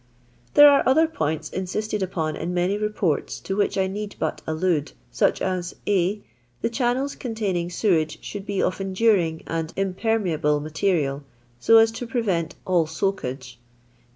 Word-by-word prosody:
| 120 0 -34
There 290 - +10
are 280 - +5
other 305 +5 +5
points 155 - -3
insifttcd 210 +3 -3
upon 165 -5 -2
in 175 +3 -4
many 180 +2 +1
i 205 - -2
Beports 210 -7 -1
to 195 - -3
which 205 -1 0
I 190 - +2
need 205 +2 -5
but 160 - -2
allude, 160 - 0 0.2
such - - +1
as 180 -2 -2
> - - -35
(a.) 200 +1 +1 0.4
The - - 0
channels 255 +3 0
containing 200 -8 -2
sewage 170 -4 +1
should 205 -1 -7
be 200 - -3
j - - +2
of 185 - -1
enduring 190 -4 +1
and 165 0 -3
impermeable 190 -6 0
material, 150 -2 -1 0.4
so 225 - +6
as 225 0 +6
to 235 +2 -6
]>revent 195 -9 -1
all 175 -4 +2
soakage. 130 -9 -3
185 Hz, 165 wpm, -24 LUFS, 160-210 Hz, 0.4 s, There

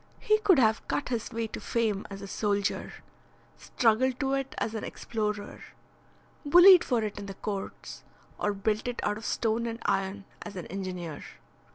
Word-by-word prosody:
He 430 0 +3
could 390 -6 +5
have 220 -3 +2
cut 285 - -2
his 235 -1 -3
way 230 0 -2
to - - -6
fame 220 -4 -1
as 195 0 -8
a - - -6
soldier, 205 0 -1 0.7
struggled 250 +2 +1
to 270 -1 0
it 270 -1 -2
as 225 - -2
an 220 - -4
explorer, 210 -2 -4 0.8
bullied 355 +4 +8
for 240 -4 0
it 210 -1 -4
in 200 - -7
the 195 - -7
courts, 200 -1 -6 0.4
or 205 - +1
built 210 +3 -1
it 245 - -3
out 210 0 -1
of 220 - -10
stone 230 +1 0
and 230 0 -4
iron 195 +1 -1 0.2
as 205 - -8
an 180 - -5
engineer. 180 -5 -5
220 Hz, 175 wpm, -28 LUFS, 200-245 Hz, 0.8 s, bullied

